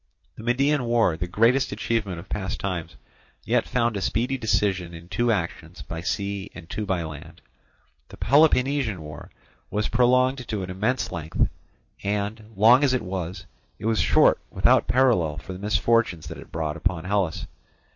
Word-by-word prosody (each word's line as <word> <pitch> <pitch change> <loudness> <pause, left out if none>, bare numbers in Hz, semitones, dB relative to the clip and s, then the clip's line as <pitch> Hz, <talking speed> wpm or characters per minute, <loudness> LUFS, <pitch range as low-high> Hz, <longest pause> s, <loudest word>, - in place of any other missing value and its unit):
The - - -10
Median 135 +3 +1
War, 115 -7 +2
the 90 +2 -4
greatest 115 +8 +2
achievement 105 -3 -2
of 85 +3 -9
past 95 -1 -3
times, 85 -4 -4 0.5
yet - - +1
found 120 -3 0
a 100 - -2
speedy 120 +7 0
decision 95 -7 0
in 85 +1 -11
two 120 +3 +1
actions 85 -3 -3
by 85 -2 -6
sea 100 +2 -3
and 90 -3 -10
two 105 +4 -4
by 95 -3 0
land. 80 -2 -9 0.7
The - - -12
Peloponnesian 140 - +3
War 75 -1 -9 0.4
was 105 0 -1
prolonged 125 0 +2
to 105 -3 -3
an 90 - -5
immense 105 +1 -1
length, 80 -3 -1 0.5
and, 105 +2 -2
long 115 +7 +6
as 130 -2 +3
it 125 - -2
was, 90 -1 -5 0.3
it - - -8
was 115 -1 +2
short - - +4
without - - +3
parallel 115 - +2
for 95 - -7
the 90 - -8
misfortunes 105 -4 +1
that - - -8
it - - -13
brought 80 -1 -3
upon 85 0 -1
Hellas. 95 -3 -1
100 Hz, 165 wpm, -25 LUFS, 90-120 Hz, 0.7 s, long